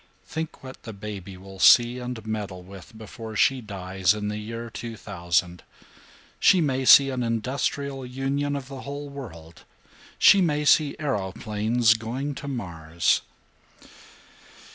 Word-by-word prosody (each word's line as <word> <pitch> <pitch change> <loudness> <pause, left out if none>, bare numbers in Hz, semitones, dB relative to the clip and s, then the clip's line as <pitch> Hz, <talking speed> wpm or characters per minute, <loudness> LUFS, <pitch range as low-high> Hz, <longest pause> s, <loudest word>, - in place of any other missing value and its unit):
Think 160 -2 -6
what 130 0 -10
that 110 - -8
baby 100 -2 -8
will 95 +1 -12
see 120 +6 +6
and 125 -3 -6
meddle 105 -4 -5
with 95 +2 -13
before 110 0 -9
she 130 +5 +3
dies 95 -2 -1
in 105 -1 -3
the 105 0 -4
year 115 +2 -7
2000! 90 -6 -2 0.8
She 190 - +5
may 135 -4 0
see 135 +1 +8
an 130 -1 -3
industrial 135 +4 -2
union 135 +3 -2
of 135 -2 -5
the 135 -1 -8
whole 145 +1 -7
world, 85 - -10 0.5
she 200 - +7
may 150 -4 +1
see 145 0 +4
aeroplanes 110 -3 +1
going 120 +6 -4
to 140 - -8
Mars." 85 - -1
115 Hz, 135 wpm, -25 LUFS, 100-135 Hz, 0.8 s, see